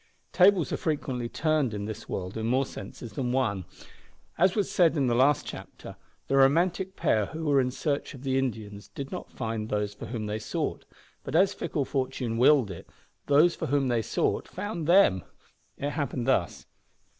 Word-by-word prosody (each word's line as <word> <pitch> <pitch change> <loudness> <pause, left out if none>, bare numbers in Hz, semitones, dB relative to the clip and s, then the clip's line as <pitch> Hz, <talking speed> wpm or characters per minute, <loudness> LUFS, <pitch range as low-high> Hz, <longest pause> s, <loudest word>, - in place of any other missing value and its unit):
Tables 185 -3 +4
are - - 0
frequently 130 -6 -2
turned 155 -7 0
in 100 0 -4
this 110 0 -7
world 90 0 -4
in 110 0 -2
more 130 +3 +2
senses 115 -3 -9
than 125 +2 -2
one. 110 -8 0 0.7
As 185 -1 +3
was 205 -3 0
said 170 -3 +3
in 140 - +2
the 120 - +2
last 130 +3 +3
chapter, - - -9 0.3
the 135 - +2
romantic 175 +7 +3
pair 110 - +1
who 160 +9 -6
were 140 -2 +4
in 125 - 0
search 140 +2 -2
of 130 - -12
the 135 -1 0
Indians 105 -6 -4
did 135 +7 -7
not - - -6
find 110 -2 -4
those 105 -1 -1
for - - -9
whom 115 -3 -4
they 105 +1 -3
sought 110 - -3 0.4
but - - -5
as 190 +3 +4
fickle 145 -4 -2
fortune 130 -4 -2
willed 130 -5 +5
it, 85 - -10 0.4
those 150 +5 +5
for - - -4
whom 140 -1 +1
they 120 -2 +1
sought - - -1
found 175 -7 -5
them. 170 - +5 0.6
It 145 +1 -2
happened 135 -5 -2
thus. 100 -10 0
130 Hz, 185 wpm, -27 LUFS, 110-155 Hz, 0.7 s, willed